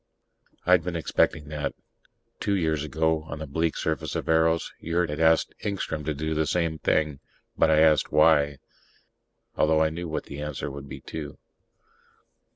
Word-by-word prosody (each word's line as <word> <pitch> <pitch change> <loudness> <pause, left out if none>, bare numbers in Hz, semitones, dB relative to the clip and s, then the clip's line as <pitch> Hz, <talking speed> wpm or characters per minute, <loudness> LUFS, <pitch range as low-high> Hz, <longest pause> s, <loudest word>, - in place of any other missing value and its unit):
I'd 90 -2 +5
been 90 0 -4
expecting 75 -2 0
that. 75 -1 -3 0.6
Two 100 - 0
years 80 -5 0
ago, 80 +2 0
on 75 - -6
the 80 - -5
bleak 80 +3 -1
surface - - -2
of - - -3
Eros, 80 0 +2
Yurt 85 -1 -1
had 75 - -4
asked 80 0 +3
Engstrom 90 -6 -3
to 75 -1 -1
do 80 +2 -2
the 80 0 0
same 80 0 0
thing. 75 -2 +1 0.4
But - - +3
I 80 0 +5
asked, 80 -1 +4
"Why?" 75 -2 +4 1.0
although 80 0 +3
I 80 - +1
knew 85 +2 -5
what 80 - -3
the 70 0 -8
answer 75 -1 -4
would 70 0 -9
be, - - -8
too. 75 -3 -7
80 Hz, 165 wpm, -26 LUFS, 75-80 Hz, 1.0 s, I'd